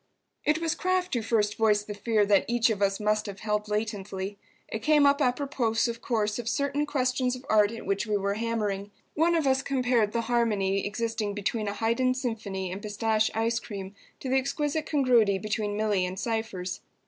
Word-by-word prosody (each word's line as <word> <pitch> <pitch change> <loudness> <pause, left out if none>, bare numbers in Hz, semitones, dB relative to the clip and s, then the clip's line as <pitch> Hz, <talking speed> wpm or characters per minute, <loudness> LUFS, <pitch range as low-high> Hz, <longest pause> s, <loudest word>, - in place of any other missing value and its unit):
It 300 +1 +3
was 330 0 0
Kraft 370 +1 0
who 240 - +1
first 215 -2 +1
voiced 210 -2 +3
the 210 - -5
fear 210 0 +1
that 200 -1 +3
each 235 -1 +2
of 205 -2 -3
us 195 -1 +2
must 210 0 +1
have 200 -1 -7
held 210 0 -1
latently. 205 -2 -3 0.3
It 220 - -4
came 295 +4 +4
up 280 +1 +4
apropos, 250 -4 +1
of 230 0 -5
course, 215 -2 0
of 230 -1 -3
certain 280 +3 0
questions 255 -2 0
of 255 +1 -11
art 210 -1 +4
at 230 - -8
which 200 +3 -1
we 210 -1 +1
were 200 0 0
hammering. 210 -3 -2 0.2
One 335 +2 +3
of 320 -3 +1
us 265 0 +3
compared 250 -6 +1
the 235 - 0
harmony 210 -5 +1
existing 220 -1 -2
between 210 +1 -2
a 200 - -1
Haydn 245 +4 +1
symphony 210 -7 -3
and 190 +2 -5
pistache 215 +1 +1
ice 225 +1 +1
cream 195 -3 -7 0.3
to - - -5
the 265 - +3
exquisite 295 +3 -2
congruity 245 -9 +3
between 210 0 -2
Milly 210 -3 +1
and 185 +1 -6
Cypher's. 220 -6 -3
225 Hz, 195 wpm, -27 LUFS, 205-255 Hz, 0.3 s, came